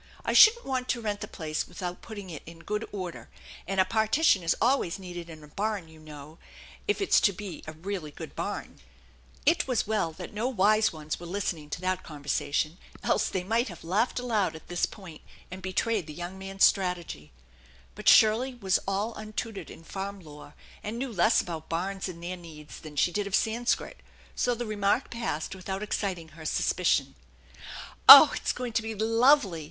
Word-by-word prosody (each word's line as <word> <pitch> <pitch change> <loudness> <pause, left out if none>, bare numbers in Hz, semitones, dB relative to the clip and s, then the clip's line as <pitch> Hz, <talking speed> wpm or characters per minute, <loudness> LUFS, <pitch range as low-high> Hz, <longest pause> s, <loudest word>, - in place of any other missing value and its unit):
I - - 0
shouldn't 470 +2 +7
want 255 -1 -2
to 240 - 0
rent 210 -2 -3
the - - -4
place 155 -3 -4
without 180 -1 -6
putting 205 -5 -9
it 155 - -7
in 165 0 -11
good 210 +1 -3
order, 185 -4 -6 0.4
and 195 -1 -1
a 185 - +5
partition 220 - +3
is 165 -1 +1
always 235 -8 +1
needed 175 -3 -8
in 155 -2 -11
a - - -12
barn, 205 +1 -3
you 160 0 -16
know, 155 0 -12 0.5
if 415 0 0
it's 395 - +4
to 200 - +4
bi 190 -3 -8
a 155 - -6
really 175 0 -5
good 145 - -10
barn/' - - -5 0.7
It 325 0 +3
wa, 255 - -1
well 210 -6 0
that - - -9
no 220 +4 -1
wise 215 -2 +3
ones 155 -2 -5
were 175 - -9
listening 170 -5 -3
to 165 - -5
that 185 0 -1
con 150 -3 -11
versation; 145 +3 -1 0.3
else - - +1
they 185 - -2
might 230 +6 +1
have 175 -5 -10
laughed 205 +9 0
aloud 215 -9 0
at 160 - -13
this 175 0 0
point 185 -7 -12 0.3
and 185 +1 -7
betrayed 190 0 -1
the 150 - -8
young 175 +2 -6
man's 195 0 -2
strategy, 180 - +1 0.6
but - - +2
Shirley 235 +4 +5
was 195 -6 +1
all 200 +4 -1
untutored 215 0 -6
in - - -12
farm 195 +3 -6
lore, 150 -3 -13 0.3
and 215 +3 -5
knew 255 -1 -4
less 190 +4 +4
about 165 -3 -7
barns 190 +3 -3
and 170 -1 -9
their 180 +1 -4
needs 155 -3 -12
than 155 -2 -11
she 175 - +2
did 205 +3 -2
of 200 - 0
Sanskrit; 235 +2 -1 0.4
so 245 -1 +1
the 240 +1 -4
remark 210 +3 0
passed 230 -11 -3
without 190 +1 -5
exciting 185 -6 -3
her 155 +1 -13
suspicion. - - +1 0.5
" - - -10
Oh, - - +13
it's - - -1
going 250 -2 -5
to 230 - +1
be 220 0 -5
lovely 225 - +3
195 Hz, 195 wpm, -28 LUFS, 170-220 Hz, 0.7 s, Oh